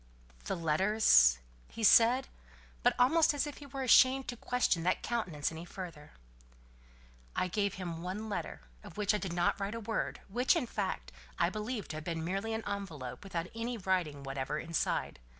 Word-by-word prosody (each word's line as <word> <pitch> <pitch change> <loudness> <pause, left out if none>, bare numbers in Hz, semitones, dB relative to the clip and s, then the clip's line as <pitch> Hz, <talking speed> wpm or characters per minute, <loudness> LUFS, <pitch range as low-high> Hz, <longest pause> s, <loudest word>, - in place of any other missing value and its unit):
"The - - -1
letters?" 165 - +4 0.3
he 230 - -7
said, 235 +5 +6 0.5
but - - +3
almost 300 +5 +4
as 285 - 0
if 295 -2 -7
he 290 - -10
were 275 -1 -5
ashamed 260 +2 +5
to 245 - -3
question 245 -7 0
that 180 +2 0
countenance 180 -13 -2
any 160 +1 -7
further. 170 -4 -9 1.2
"I - - +1
gave 200 +2 -1
him 175 -3 -5
one 190 +5 -4
letter, 205 - -4 0.2
of 165 - -12
which 210 0 +2
I 210 - 0
did 190 -4 -4
not 175 +3 +1
write 200 +2 -3
a - - -4
word, 225 0 -3
which, 245 +6 +2
in - - 0
fact, - - -3 0.3
I - - +2
believe 215 0 -4
to 155 - -4
have 155 - -6
been 165 -1 -3
merely 195 +5 -2
an 220 - -5
envelope, 175 -12 -5
without 175 -4 -3
any 230 +1 -3
writing 180 -8 -1
whatever 135 +2 -3
inside. 165 - -2
195 Hz, 180 wpm, -32 LUFS, 165-230 Hz, 1.2 s, said